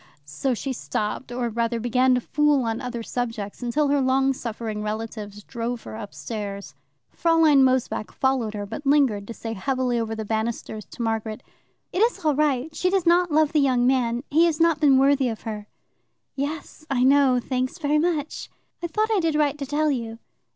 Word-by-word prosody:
So 195 - -2
she 265 +4 -3
stopped, 225 +1 -3
or 245 0 -1
rather 230 +1 -1
began 250 +2 +3
to 250 - 0
fool 295 0 +2
on 225 0 -2
other 245 -2 -4
subjects, 225 -4 -4
until 280 +5 +1
her 285 0 +2
long 265 +1 +2
suffering 225 -3 -5
relatives 210 -1 -5
drove 235 +2 -4
her - - -8
upstairs. 205 -2 -6 0.4
Fraulein 325 -4 +4
Mosebach 255 -4 0
followed 255 -5 0
her, 205 -1 -4
but 285 +8 -7
lingered 270 -8 +2
to 230 - -6
say 225 -1 -5
heavily 250 +2 -1
over 225 -1 -2
the 220 0 -5
banisters 220 -1 -3
to 235 - -7
Margaret, 225 0 -2 0.5
"It 360 - -1
is 440 -6 +1
all 305 - +4
right 295 0 0
she 365 - +1
does 380 -2 +1
not 345 0 +4
love 310 0 +3
the 305 - +4
young 255 -3 +2
man 245 -2 +1
he 325 +4 +5
has 330 -2 0
not 330 -2 +3
been 285 -3 +5
worthy 270 -1 +3
of 225 - -6
her." 210 -2 -6 0.7
"Yes, 295 +3 -5
I 255 -3 +1
know; 265 -1 +5
thanks 255 +3 -2
very 300 -2 +1
much." 310 -3 -2 0.3
"I 345 - -2
thought 430 +5 0
I 415 - +3
did 325 -3 0
right 295 -2 +2
to 280 - -4
tell 300 +2 +1
you." 230 -4 -3
255 Hz, 190 wpm, -24 LUFS, 225-295 Hz, 0.7 s, he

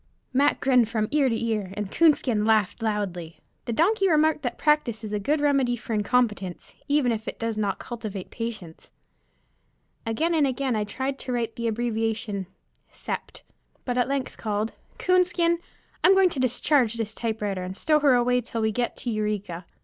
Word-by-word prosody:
Mac 280 +3 +3
grinned 250 -4 +3
from 220 -2 0
ear 290 -3 +3
to 230 0 -1
ear, 215 -4 -1
and 210 -2 -3
Coonskin 275 -9 +3
laughed 215 -1 +2
loudly. 195 -7 -3 0.3
The - - -2
donkey 390 - +3
remarked 310 -1 +3
that 245 -3 -3
practice 300 -7 +1
is 210 -1 -5
a 210 - 0
good 295 +9 +1
remedy 275 -4 +2
for 240 -1 -6
incompetence, 210 -4 0
even 285 -4 +2
if 220 -1 -3
it - - -4
does 230 -1 -2
not 205 -2 -1
cultivate 215 -6 -6
patience. 215 -8 -6 1.1
Again 310 +10 0
and 305 -4 +3
again 260 -1 -1
I 210 -1 0
tried 265 +6 -3
to 255 - -5
write 235 -2 -2
the 235 0 -2
abbreviation 225 -3 -2 0.4
"Sept.," - - -6 0.4
but 245 - -1
at 245 0 +2
length 275 -1 -3
called 215 0 -2 0.3
"Coonskin, 355 -2 +2 0.4
I'm 380 +2 +7
going 380 -2 +5
to 280 - -4
discharge 255 -1 +2
this 225 -2 -3
typewriter, 210 -4 -2
and 185 +1 -6
stow 305 -1 +3
her 285 -4 +5
away 245 0 +2
till 230 -1 -4
we 220 0 +1
get 240 +3 -2
to 240 - -3
Eureka." 210 -5 -3
235 Hz, 175 wpm, -25 LUFS, 215-275 Hz, 1.1 s, I'm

